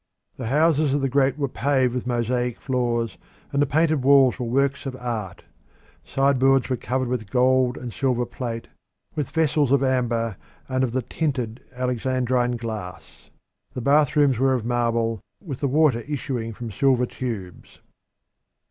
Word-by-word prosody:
The 125 - -4
houses 150 +1 +3
of 145 - 0
the 135 - 0
great 135 +1 +2
were 140 -2 0
paved 130 -2 +1
with 125 -1 -3
mosaic 120 0 -1
floors, 120 -3 -1 0.3
and 140 - +1
the 145 - +3
painted 155 -1 +2
walls 135 -1 +5
were 125 - -2
works 140 +3 0
of 130 - -4
art: 115 -8 -5 0.6
sideboards 135 -1 +2
were - - +2
covered 130 +2 -2
with 120 -4 -3
gold 130 0 +3
and 120 -3 -7
silver 125 -1 0
plate, 120 -1 -5 0.5
with 150 -3 -3
vessels 150 -4 +1
of 140 -1 +4
amber 120 -5 0 0.3
and 130 0 0
of 120 -3 -1
the 130 -1 0
tinted 130 -5 -3
Alexandrine 125 0 0
glass. 110 -6 -8 0.5
The 125 - -3
bathrooms 145 -1 +3
were 135 0 +3
of 120 -3 -3
marble, 115 -2 0 0.2
with 145 -10 -7
the 140 - 0
water 140 -3 +3
issuing 125 -4 -4
from 115 +1 -7
silver 130 +2 +2
tubes. 110 -9 -7
125 Hz, 155 wpm, -23 LUFS, 120-135 Hz, 0.6 s, walls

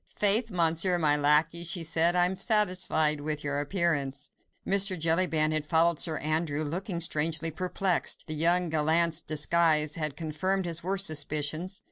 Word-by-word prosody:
"Faith! 210 +3 +4
Monsieur, 175 0 +1
my 150 -3 +2
lacquey," 150 +3 +1
she 170 0 -1
said, 165 +2 +2
"I 175 0 +3
am 185 +1 -3
satisfied 180 -8 0
with 150 0 -4
your 145 0 -3
appearance!" 145 -4 -3 0.3
Mr. 195 -1 +1
Jellyband 160 -1 0
had 155 -1 -3
followed 165 0 +1
Sir 160 -2 0
Andrew, 155 0 -2
looking 175 +4 -5
strangely 160 0 0
perplexed. 185 +2 -2
The 155 - -6
young 170 +3 +3
gallant's 160 +1 +1
disguise 155 0 +1
had 155 -3 -3
confirmed 185 +5 -3
his 170 -1 -1
worst 195 +2 -1
suspicions. 155 +4 -2
165 Hz, 150 wpm, -27 LUFS, 155-180 Hz, 0.3 s, Faith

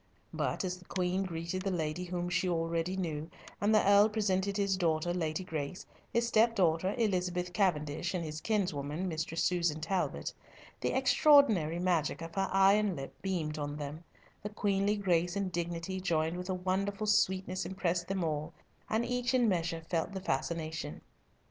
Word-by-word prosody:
But, - - -1
as 180 0 -3
the 180 - -17
Queen 185 +1 -1
greeted 170 0 -3
the 195 - -1
lady 170 -1 -2
whom 175 0 -3
she 185 +1 0
already 165 +2 -1
knew, 160 -3 -3 0.3
and 205 +1 +3
the 210 - +4
Earl 205 +1 +7
presented 200 -2 0
his 200 -1 +2
daughter, 170 -1 +1
Lady 160 0 -2
Grace, 160 0 -4 0.3
his 235 0 +1
stepdaughter, 195 -6 +3
Elizabeth 180 -5 0
Cavendish, 175 -2 0
and 170 -2 -2
his 155 0 -5
kinswoman, 175 -5 -1
Mistress 160 -1 -2
Susan 170 -4 +1
Talbot, 180 +4 -2 0.5
the - - -1
extraordinary 265 - +5
magic 170 -3 0
of 165 - -8
her 195 0 0
eye 195 +1 +6
and 210 -3 +2
lip 135 -2 -7
beamed 160 -6 -2
on 145 0 -3
them, 150 +2 -6 0.4
the 210 - -4
queenly 205 -1 +1
grace 175 -2 +1
and 195 -2 -1
dignity 175 +2 -3
joined 165 -2 0
with 180 +1 -6
a 185 - 0
wonderful 195 +3 -1
sweetness 190 -2 +1
impressed 175 -1 -1
them 190 -2 -1
all, 155 0 -2 0.4
and 225 +2 +1
each 250 +1 0
in 245 -2 +4
measure 170 -4 0
felt 165 +3 -1
the 190 - -3
fascination. 160 -1 -3
180 Hz, 165 wpm, -32 LUFS, 165-195 Hz, 0.5 s, Earl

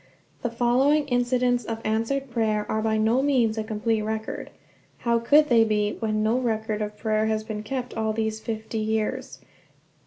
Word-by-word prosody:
The 240 - -1
following 260 +6 +2
incidents 245 0 +1
of 225 +1 -4
answered 230 +5 -1
prayer 215 -3 0
are 220 - -1
by 220 0 +1
no 225 +4 +3
means 250 -6 +2
a 220 - -2
complete 220 +1 -1
record. 220 +1 -4 0.5
How 235 -1 +1
could 295 +6 +5
they 235 -4 +5
be, 210 -1 0
when 215 -1 0
no 225 +4 +2
record 220 -3 -1
of 210 0 -4
prayer 215 -1 0
has 215 0 0
been 215 -1 -5
kept 250 +2 -4
all 220 0 -1
these 220 0 -2
fifty 220 0 -4
years? 220 +5 -2
225 Hz, 175 wpm, -25 LUFS, 215-245 Hz, 0.5 s, could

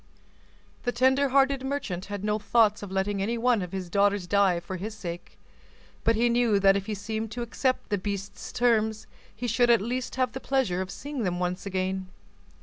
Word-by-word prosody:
The 245 - -1
tender 265 +3 +3
hearted 275 0 +3
merchant 265 -10 -3
had 205 -1 -6
no 210 0 0
thoughts 215 -1 +3
of 205 -2 -7
letting 195 +1 -1
any 230 +4 -1
one 235 -2 +2
of 180 -1 -5
his 190 -2 -4
daughters 200 +1 +2
die 195 -2 +3
for 185 +2 -6
his 210 +4 -5
sake; 175 -4 -7 0.7
but 230 - +3
he 235 +2 +3
knew 235 -3 +3
that 195 0 +5
if 200 +1 -2
he 215 - -2
seemed 220 +2 -4
to 240 +1 -3
accept 255 +2 -1
the 205 - 0
beast's 200 +1 -5
terms, 220 -2 +1 0.3
he 245 - -5
should 240 +1 +2
at 235 -1 +6
least 245 +4 -3
have 255 -1 +1
the 265 - -6
pleasure 255 -9 0
of 190 - -4
seeing 285 +2 -5
them 180 -4 -1
once 180 +2 -2
again. 190 0 -2
210 Hz, 200 wpm, -27 LUFS, 195-240 Hz, 0.7 s, at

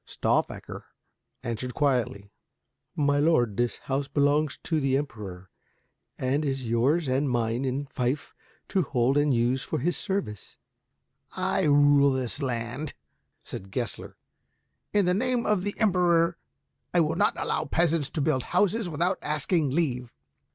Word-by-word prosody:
Stauffacher - - -2 0.6
answered 120 +2 -4
quietly, 125 -8 0 0.6
"My 145 -1 +2
lord, 135 -9 +3
this 120 +2 0
house 135 +1 -2
belongs 145 +1 +1
to 160 -2 0
the 135 -2 +2
Emperor, 100 -10 -6 0.7
and 135 +4 0
is 135 -4 -2
yours 135 +8 +2
and 135 +2 +1
mine 120 +1 0
in 135 +2 -2
fief 130 +2 -2 0.4
to 190 - +2
hold 130 -4 +1
and 145 0 +3
use 125 +1 +1
for - - -3
his 175 +7 0
service." 190 - -4 0.8
"I - - 0
rule 145 -1 +5
this 130 +2 -3
land," 125 +3 -3 0.5
said 95 - -8
Gessler, 120 +2 -5 0.7
"in 205 -2 +3
the 180 - +3
name 245 +3 0
of 210 -3 +2
the 205 +2 -3
Emperor, 175 -5 +3
and - - -13 0.6
I - - +6
will 160 0 +1
not - - +2
allow 155 - -1
peasants 165 -1 +1
to 155 - -3
build 140 -3 +1
houses 195 - +1
without 175 +4 0
asking 150 +1 0
leave. 130 -5 -1
145 Hz, 145 wpm, -27 LUFS, 125-165 Hz, 0.8 s, I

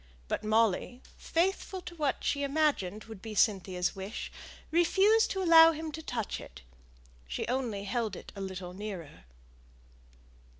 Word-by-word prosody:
But - - -2
Molly, 220 +3 +1
faithful 375 +2 -1
to 345 - -8
what 295 -5 -1
she 285 - 0
imagined 280 -9 0
would 220 -3 -11
be 220 0 -7
Cynthia's 185 -4 +1
wish, 195 +3 -6 0.4
refused 390 +7 +4
to 385 -1 -2
allow 330 -1 +8
him 315 0 -5
to 320 - -6
touch 235 -8 -3
it; 65 -1 -12 0.6
she 65 - -3
only 240 -6 -2
held 220 +2 -2
it - - -10
a 200 - -6
little 185 -2 -6
nearer. 185 - -7
225 Hz, 140 wpm, -30 LUFS, 195-320 Hz, 0.6 s, allow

